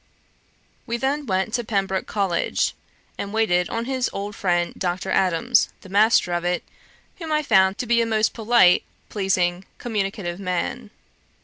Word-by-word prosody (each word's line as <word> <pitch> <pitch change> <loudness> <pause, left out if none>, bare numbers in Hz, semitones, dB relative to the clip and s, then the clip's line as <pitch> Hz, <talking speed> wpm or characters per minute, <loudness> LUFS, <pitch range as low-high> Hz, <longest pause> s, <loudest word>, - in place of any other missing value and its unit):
We 235 0 -1
then 275 +3 -1
went 190 +3 -1
to 240 - 0
Pembroke 195 -3 -1
College, 195 -5 0 0.5
and 200 - -4
waited 190 -5 +1
on 230 +1 -3
his 260 -1 -1
old 200 +1 -5
friend 175 -2 0
Dr. 180 0 -2
Adams, 190 +6 +2
the 190 - -13
master 205 -2 +3
of 175 0 -1
it, 175 0 -1 0.5
whom 325 -3 -6
I 305 0 +1
found 190 -7 +3
to - - -3
be 235 0 +3
a - - +1
most 220 -1 +1
polite, 225 -5 +4 0.3
pleasing, 185 -3 0
communicative 195 -5 -3
man. 180 - -3
200 Hz, 150 wpm, -23 LUFS, 180-230 Hz, 0.5 s, polite